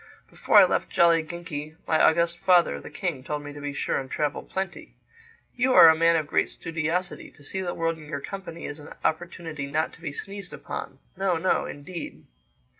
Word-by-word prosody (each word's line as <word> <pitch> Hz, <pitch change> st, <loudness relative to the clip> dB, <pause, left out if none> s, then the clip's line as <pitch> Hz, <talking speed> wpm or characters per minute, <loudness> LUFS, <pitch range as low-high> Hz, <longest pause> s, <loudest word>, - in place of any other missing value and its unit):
Before -, -, +3 dB
I -, -, +10 dB
left -, -, 0 dB
Jolliginki 165 Hz, -2 st, +1 dB
my 160 Hz, -, +2 dB
august 170 Hz, +1 st, +3 dB
father, 180 Hz, -, +4 dB
the -, -, -10 dB
King, 170 Hz, -9 st, -3 dB
told 150 Hz, +1 st, -4 dB
me 145 Hz, 0 st, -8 dB
to 145 Hz, -, -9 dB
be 145 Hz, 0 st, -3 dB
sure 140 Hz, -, -1 dB
and 135 Hz, -1 st, -7 dB
travel 150 Hz, +1 st, -1 dB
plenty. 190 Hz, 0 st, -5 dB, 0.6 s
You 255 Hz, +1 st, +2 dB
are 165 Hz, -, +11 dB
a 160 Hz, -, +6 dB
man 165 Hz, +1 st, +4 dB
of 160 Hz, -2 st, +1 dB
great -, -, +1 dB
studiosity. 165 Hz, +2 st, -3 dB
To 145 Hz, -, -17 dB
see 190 Hz, +6 st, -2 dB
the 175 Hz, -2 st, -3 dB
world 165 Hz, 0 st, -1 dB
in 155 Hz, -, -11 dB
your 140 Hz, -2 st, -3 dB
company 190 Hz, 0 st, -7 dB
is 145 Hz, +1 st, -6 dB
an 145 Hz, -, -11 dB
opportunity 160 Hz, -3 st, -2 dB
not 155 Hz, +3 st, -1 dB
to -, -, -15 dB
be 155 Hz, -, -4 dB
sneezed 195 Hz, +5 st, -7 dB
upon. -, -, -6 dB, 0.2 s
No, 190 Hz, -2 st, +1 dB
no, 185 Hz, +3 st, +1 dB
indeed." 165 Hz, +4 st, -8 dB
165 Hz, 195 wpm, -26 LUFS, 150-175 Hz, 0.6 s, are